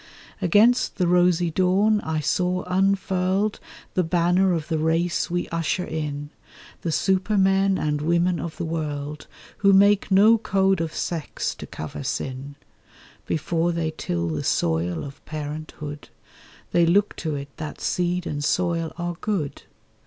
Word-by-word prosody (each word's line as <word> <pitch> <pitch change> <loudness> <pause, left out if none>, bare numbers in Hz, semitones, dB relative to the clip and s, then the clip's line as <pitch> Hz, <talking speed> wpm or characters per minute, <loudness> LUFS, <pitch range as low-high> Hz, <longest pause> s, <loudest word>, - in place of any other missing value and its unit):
Against 220 +8 +4
the 185 - +1
rosy 175 -1 +3
dawn, 195 +5 +3
I 160 -1 -2
saw 180 +3 0
unfurled 190 +1 +1 0.3
The 185 - +2
banner 180 +3 +2
of 165 -3 -1
the 160 -2 -1
race 165 +2 +1
we 175 +1 -1
usher 165 +2 -1
in, 145 -2 -4 0.5
The 165 - -2
supermen 195 +1 +2
and 150 -1 -1
women 170 +2 +1
of 160 +1 -6
the 175 - -3
world, 150 -2 -4 0.3
Who 200 -1 +4
make 200 +1 +5
no 210 +4 +6
code 195 -4 +2
of 165 -1 -4
sex 165 -4 -3
to - - -10
cover 80 - -7
sin; 135 +1 -4 0.7
Before 165 +2 0
they 165 -2 -2
till 85 - -2
the 75 -2 -3
soil 85 +1 0
of 140 0 -10
parenthood, 150 -1 -6 0.6
They 170 -1 +4
look 200 +4 +3
to 155 -3 -3
it 140 0 -7
that 155 -2 -6
seed 180 0 -1
and 145 -3 -3
soil 170 0 0
are 175 -1 -3
good. 190 -10 -2
170 Hz, 145 wpm, -24 LUFS, 155-190 Hz, 0.7 s, no